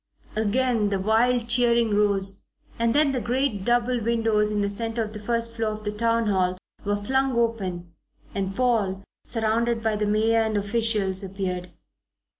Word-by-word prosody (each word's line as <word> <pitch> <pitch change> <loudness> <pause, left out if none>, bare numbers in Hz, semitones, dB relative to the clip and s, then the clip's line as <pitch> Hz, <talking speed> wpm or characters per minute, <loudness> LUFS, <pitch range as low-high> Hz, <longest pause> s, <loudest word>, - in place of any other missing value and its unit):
Again 220 0 +1
the 200 - 0
wild 230 +4 +2
cheering 235 -2 +3
rose, 200 -2 0 0.4
and 230 0 +2
then 295 -1 +4
the 255 -2 -1
great 245 -4 -1
double 240 +1 +1
windows 225 -2 +2
in 210 -1 -1
the 200 - +1
centre 225 +3 -2
of 215 0 -7
the 210 - -6
first 230 +2 -2
floor 225 -2 -1
of 215 0 -8
the 210 - -2
Town 230 +2 +1
Hall 185 -3 +1 0.3
were 205 0 0
flung 265 +2 +1
open 190 -7 -1 0.4
and 195 -1 -2
Paul, 210 -6 +1 0.2
surrounded 230 0 0
by 220 -1 +1
the 210 0 -1
mayor 220 +2 +3
and 220 -1 0
officials, 205 -2 0
appeared. 185 -2 -4
220 Hz, 165 wpm, -25 LUFS, 205-235 Hz, 0.4 s, then